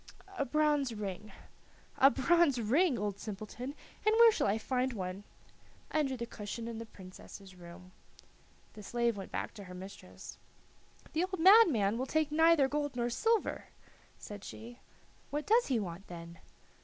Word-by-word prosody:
"A 280 - -1
bronze 295 -3 +1
ring." 210 0 -6 0.7
"A 270 - +8
bronze 285 -1 +3
ring, 265 - +2
old 205 -1 -3
simpleton! 220 +6 -7 0.3
And 430 +1 +3
where 465 0 +8
shall - - 0
I 200 +2 +1
find 255 +3 -1
one?" 190 -1 -5 0.7
"Under 275 -4 0
the 235 - -4
cushion 230 0 -6
in 230 -1 -6
the 230 - -7
Princess's 190 0 -12
room." 180 +1 -13 0.8
The 215 - -11
slave 235 +2 0
went 195 -1 -8
back - - -4
to 205 -3 -10
her 180 0 -10
mistress. 190 +2 -11 0.7
"The 320 - +1
old 375 -1 -6
madman 320 - +6
will 260 - -2
take 310 0 0
neither 320 -2 +5
gold 290 -1 -2
nor 240 0 -1
silver," 450 - 0 0.5
said 205 -1 -9
she. 240 +2 -10 0.5
"What 295 +1 -3
does 465 +3 +3
he 255 -4 +1
want 185 -1 -6
then?" 170 -1 -10
235 Hz, 155 wpm, -32 LUFS, 200-300 Hz, 0.8 s, A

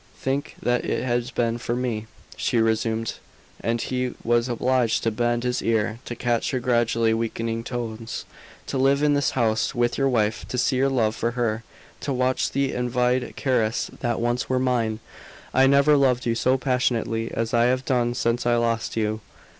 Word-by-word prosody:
"Think 135 +2 -2
what 125 0 +1
it - - -1
has 120 0 0
been 120 -2 -1
for 120 0 -2
me!" 120 -3 -2 0.3
she - - 0
resumed, 115 0 0 0.4
and 115 +1 -1
he 125 +1 -2
was 120 +1 +2
obliged 125 -1 +1
to 115 - +1
bend 120 +1 0
his 125 0 0
ear 110 0 0
to 120 - -5
catch 120 -1 0
her 130 - -1
gradually 115 -2 +2
weakening 115 0 -2
tones. 115 -2 -5 0.4
"To 135 - -2
live 140 +2 +3
in 150 -1 +4
this 145 -1 +2
house 110 0 +1
with 120 +1 +1
your 135 0 +3
wife 110 -3 0
to 125 - -4
see 125 +1 +2
your 135 +1 +3
love 115 -5 +1
for 115 +1 -1
her 115 -2 0 0.4
to 140 - -3
watch 130 0 +1
the 140 0 0
envied 125 +1 0
caresses 120 -5 0
that 120 -2 -1
once 120 +2 -1
were 130 - +2
mine! 120 -4 0 0.5
I 135 0 +5
never 140 +2 +5
loved 130 -3 +2
you 115 - +2
so 130 +3 +2
passionately 120 -3 0
as 115 0 -2
I 120 0 +4
have 130 +1 +1
done 120 -2 +1
since 120 +1 0
I 120 - +4
lost 115 -1 0
you. 110 0 -1
120 Hz, 185 wpm, -24 LUFS, 115-130 Hz, 0.5 s, I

